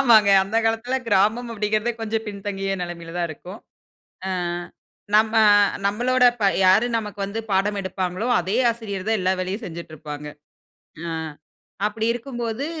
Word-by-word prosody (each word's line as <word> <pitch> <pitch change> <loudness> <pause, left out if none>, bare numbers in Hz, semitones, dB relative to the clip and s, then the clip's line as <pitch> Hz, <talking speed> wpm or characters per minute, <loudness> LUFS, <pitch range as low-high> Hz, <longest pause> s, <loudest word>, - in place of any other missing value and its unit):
ஆமாங்க. 220 -6 +6
அந்த 210 +4 -3
காலத்தில 225 +3 0
கிராமம் 215 +4 +2
அப்பிடிங்கிறதே 215 +2 0
கொஞ்சம் 225 0 -2
பின்தங்கிய 195 -1 -3
நிலைமையில 170 -1 -7
தான் 170 -1 0
இருக்கும். 180 +7 -10 0.7
ஆ, - - -2 0.9
நம்ம 220 +1 +4 0.5
நம்மளோட 250 +5 +2
இப்ப 220 -4 +1 0.2
யார் 195 +6 +5
நமக்கு 210 -2 -6
வந்து 200 +3 -4
பாடம் 200 +2 +1
எடுப்பாங்களோ, 185 +3 -3
அதே 190 +6 -1
ஆசிரியர் 210 -4 -6
தான் 220 -2 +2
எல்லா 185 0 +2
வேலையும் 190 +5 -3
செஞ்சுட்ருப்பாங்க. 155 -3 -8 0.8
ஆ, - - -4 0.8
அப்பிடி 220 +1 -2
இருக்கும்போது, 240 +1 -4
210 Hz, 130 wpm, -23 LUFS, 190-225 Hz, 0.9 s, ஆமாங்க